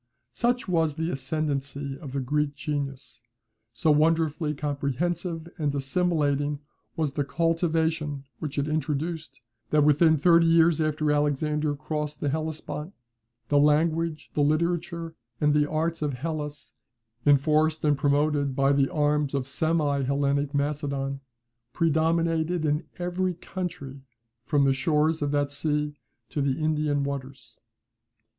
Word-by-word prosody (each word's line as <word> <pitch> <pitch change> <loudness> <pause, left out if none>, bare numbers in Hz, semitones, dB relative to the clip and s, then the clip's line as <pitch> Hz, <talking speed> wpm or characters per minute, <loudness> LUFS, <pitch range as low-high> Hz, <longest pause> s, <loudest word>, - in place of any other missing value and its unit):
Such 240 - 0
was 165 -4 +1
the 160 +2 -2
ascendancy 140 -1 -2
of 140 -5 -8
the 140 - -1
Greek 145 +2 0
genius, 140 -3 -4 0.5
so 120 +7 +2
wonderfully 155 0 +2
comprehensive 160 +4 -2
and 145 -2 0
assimilating 145 -1 0 0.4
was 155 -4 -1
the 145 - 0
cultivation 160 0 0 0.2
which 150 -2 -5
it 140 +1 0
introduced, 155 0 -3 0.3
that, 150 -1 +4
within 155 +2 +5
thirty 165 +2 +5
years 165 -1 +4
after 155 -1 +1
Alexander 150 +1 +1
crossed 150 0 -4
the 145 - -1
Hellespont, 155 +2 -4 0.5
the 145 - +4
language, 155 +2 +1
the 150 - +1
literature, 165 +2 0 0.3
and 150 -1 +3
the 150 0 +2
arts 160 +1 -1
of 150 -2 -1
Hellas, 150 +1 -5 0.5
enforced 155 +2 +3
and 150 -1 +4
promoted 145 0 +1
by 135 +1 +3
the 140 -1 +2
arms 150 -2 +1
of 135 -2 -2
semi 150 -1 +1
Hellenic 140 +1 0
Macedon, 140 -1 -1 0.5
predominated 165 0 +1
in 150 +1 0
every 180 0 -1
country 170 -7 -6 0.4
from 145 -2 +2
the 135 - +4
shores 150 +4 +1
of 145 - 0
that 145 0 0
sea 150 0 -1 0.4
to 145 - -2
the 135 -1 0
Indian 150 -2 +1
waters. 135 -4 -6
150 Hz, 130 wpm, -26 LUFS, 140-160 Hz, 0.5 s, within